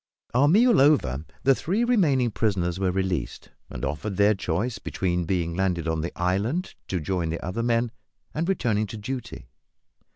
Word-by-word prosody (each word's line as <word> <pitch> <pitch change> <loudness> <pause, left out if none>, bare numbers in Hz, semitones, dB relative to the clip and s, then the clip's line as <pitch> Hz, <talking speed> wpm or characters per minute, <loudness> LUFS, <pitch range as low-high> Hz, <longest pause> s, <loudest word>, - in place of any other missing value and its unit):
Our 130 +4 +4
meal 220 - +5
over, 80 - +3 0.2
the 135 - +6
three 195 - 0
remaining 150 - +3
prisoners 95 -5 0
were 95 -1 +1
released, 95 -1 -2 0.2
and - - -5
offered 85 +8 -3
their 105 +1 +5
choice 100 +5 -2
between 90 -2 -1
being 85 -1 -1
landed 90 -3 0
on 80 -1 0
the 85 - -3
island 100 - -1
to 90 - -1
join 85 +1 -1
the 85 +2 -4
other 90 +6 -2
men, 115 0 +1 0.4
and 165 +4 -1
returning 110 - +1
to 110 - -7
duty. 110 - -6
100 Hz, 165 wpm, -25 LUFS, 90-130 Hz, 0.4 s, the